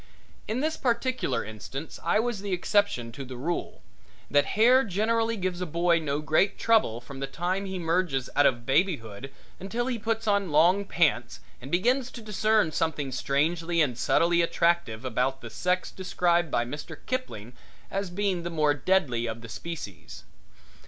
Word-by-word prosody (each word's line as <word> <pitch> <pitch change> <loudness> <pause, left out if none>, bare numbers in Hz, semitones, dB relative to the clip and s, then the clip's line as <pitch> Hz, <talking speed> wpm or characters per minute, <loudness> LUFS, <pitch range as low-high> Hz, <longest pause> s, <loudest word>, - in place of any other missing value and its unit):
In 225 +4 -1
this 315 +1 -1
particular 240 - 0
instance 120 +8 -7
I 170 +5 +2
was 230 -3 -1
the 200 -2 -3
exception 180 - +1
to 135 +4 -7
the 130 -1 -8
rule, 165 +7 -4 0.5
that 145 0 +4
hair 250 +4 +6
generally 225 +3 0
gives 185 -2 -2
a 180 - -2
boy 170 +1 +2
no 150 -2 -2
great 155 +6 +2
trouble 220 - +2
from 135 +2 -10
the 135 - -3
time 175 +8 -2
he 190 0 -4
merges 165 -6 0
out 145 - +6
of 120 -2 -1
babyhood 135 - 0 0.3
until 225 +6 -3
he 250 -2 -2
puts 225 +1 -2
on 200 -3 +2
long 175 +7 +4
pants 170 -5 +1 0.2
and 130 - -8
begins 245 - +1
to 235 - -8
discern 215 -3 +2
something 150 -4 -1
strangely 165 +6 0
and 140 -6 +2
subtly 170 +8 +3
attractive 170 -9 +1
about 130 +2 -1
the 115 - -9
sex 180 +8 -1
described 175 -2 +1
by 120 - 0
Mr. 145 +5 -7
Kipling 125 - -4 0.4
as 195 -1 -2
being 190 -1 -1
the 170 - -4
more 155 -3 +2
deadly 140 -6 +1
of 115 0 -5
the 115 - -10
species. 110 - -8
170 Hz, 165 wpm, -27 LUFS, 135-200 Hz, 0.5 s, hair